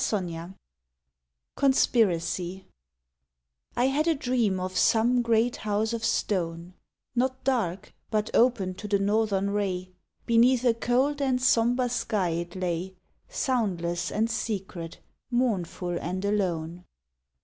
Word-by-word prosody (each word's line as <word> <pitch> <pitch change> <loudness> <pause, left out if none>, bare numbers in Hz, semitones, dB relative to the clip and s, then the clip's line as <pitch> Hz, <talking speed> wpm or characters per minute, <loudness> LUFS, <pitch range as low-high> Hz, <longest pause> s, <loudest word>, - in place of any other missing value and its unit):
18 175 -3 -3 1.0
CONSPIRACY 190 -8 +1 1.1
I 245 - +3
had 285 +4 +1
a 330 - +3
dream 240 -8 0
of 185 0 -4
some 240 +2 +3
great 235 0 +2
house 215 +2 -1
of 230 -1 -3
stone, 175 -6 -1 0.4
Not 260 +1 0
dark, 210 -9 -1 0.2
but 215 -1 -1
open 230 -6 +3
to 210 +3 -8
the 205 -1 +2
northern 200 -1 +1
ray. 185 -3 -2 0.3
Beneath 240 +2 +4
a 240 - +5
cold 260 +5 +1
and 260 -2 +1
somber 245 0 +3
sky 215 -6 -1
it 170 +1 -4
lay, 185 0 -3 0.3
Soundless 195 - -1
and 220 +2 +1
secret, 190 -7 -4 0.3
mournful 190 -8 -1
and 185 +3 -3
alone. 180 -4 -1
210 Hz, 115 wpm, -27 LUFS, 185-245 Hz, 1.1 s, a